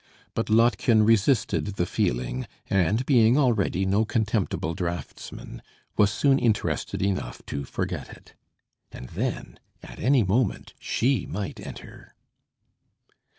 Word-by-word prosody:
But 115 - -2
Lottchen 115 0 +4
resisted 115 +1 +3
the 85 - 0
feeling, 60 -3 -1 0.2
and, 100 +6 +2
being 120 -2 +5
already 110 -8 +2
no 100 +3 +2
contemptible 105 -7 -1
draughtsman, 85 0 -6 0.3
was 105 -1 +4
soon 135 +4 +3
interested 110 -4 0
enough 100 -1 -2
to 70 -1 -4
forget - - -4
it. - - -15 0.6
And 60 - -9
then, - - -4 0.2
any 130 -2 +1
moment 105 +3 0
she 125 -4 0
might 100 +1 -5
enter. - - -11
105 Hz, 110 wpm, -26 LUFS, 95-120 Hz, 0.6 s, being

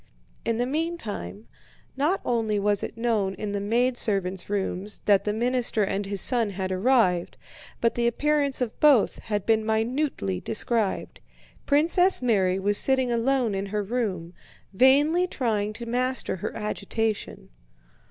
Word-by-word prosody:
In 230 -1 -1
the 245 - 0
meantime, 235 - -4 0.5
not 300 +8 0
only 225 -3 0
was 205 0 +1
it 230 - -6
known 220 -5 0
in 210 0 -5
the 200 - -2
maidservants' 205 -4 +1
rooms 200 0 -3
that 200 -2 +3
the 210 - 0
minister 240 0 +1
and 195 0 -2
his 200 -2 +1
son 235 -4 +3
had 190 -1 -4
arrived, 185 -3 +1 0.4
but 230 - +2
the 235 0 0
appearance 285 +2 0
of 240 -3 -3
both 290 -8 +4
had 205 -3 -3
been 220 -1 +2
minutely 220 - -1
described. 225 -2 -1 0.5
Princess 335 +6 +3
Mary 195 -7 +1
was 205 +1 +3
sitting 260 -2 +2
alone 240 -1 +1
in 195 +1 -3
her 210 +1 -2
room, 195 -6 -3 0.4
vainly 290 - +4
trying 215 - -1
to 235 +2 -8
master 250 -3 -1
her - - -4
agitation. 215 - -3
225 Hz, 140 wpm, -25 LUFS, 200-255 Hz, 0.5 s, both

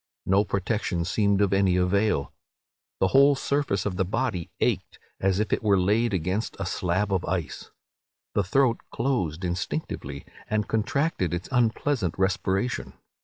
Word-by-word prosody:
No 95 +2 +4
protection 100 -3 -1
seemed 100 +1 +2
of 100 -1 +2
any 95 -2 +3
avail. 90 -3 +1 0.7
The 95 - +3
whole 140 +5 +6
surface 140 -9 -1
of 95 -3 -2
the 95 - +2
body 100 -3 -2
ached - - -1 0.2
as 95 0 +1
if 110 - 0
it - - +1
were 100 -3 +3
laid 110 +5 +2
against 95 +4 -1
a 100 - -2
slab 95 +3 0
of 95 -2 +1
ice. 85 -7 -3 0.6
The 100 - +2
throat 120 +4 +2
closed 95 - -1
instinctively, 85 -5 -4 0.2
and 105 -1 0
contracted 110 - 0
its 90 +1 -6
unpleasant 120 - +1
respiration. 95 +4 0
100 Hz, 145 wpm, -26 LUFS, 90-115 Hz, 0.7 s, whole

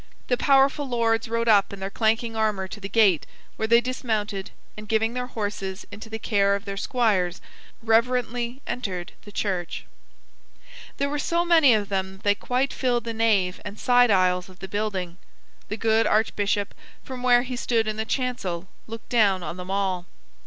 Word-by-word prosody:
The 250 - +4
powerful 275 +2 +3
lords 230 -2 +1
rode 230 0 -1
up 205 -3 +4
in 200 - -8
their 195 +1 -4
clanking 225 +1 0
armor 210 -3 0
to 210 - -9
the 195 -1 -6
gate, 200 -9 +3 0.3
where 220 - -2
they 235 +1 +5
dismounted, 220 -5 -3 0.3
and 215 0 -10
giving 225 +1 +1
their 250 0 -3
horses 205 -4 -4
into 215 +2 -9
the 220 - -4
care 200 -2 +2
of 200 +2 -6
their 200 -1 -4
squires, 195 -5 0 0.4
reverently 240 +2 +1
entered 185 -8 -4
the 205 - -11
church. 185 -4 -3 1.1
There 280 - 0
were 290 +1 -2
so 340 +3 0
many 320 -8 +6
of 205 -2 -2
them 190 -1 -2
that 190 - -17
they 205 - +4
quite 255 +6 -1
filled 245 -3 0
the 230 -1 -4
nave 210 -5 +1
and 205 0 -7
side 245 -1 +4
aisles 185 -2 +2
of 185 - -15
the 190 - -8
building. 190 -3 -3 0.5
The 215 - -3
good 225 0 +2
archbishop, 205 -2 +1 0.3
from 260 -2 -7
where 245 -1 +4
he 255 0 -5
stood 230 -2 0
in 215 0 -2
the 220 - -1
chancel, 220 -9 -3 0.2
looked 225 0 -9
down 200 -6 +3
on 165 +2 -5
them 180 0 -8
all. 190 -2 -1
220 Hz, 180 wpm, -25 LUFS, 195-240 Hz, 1.1 s, many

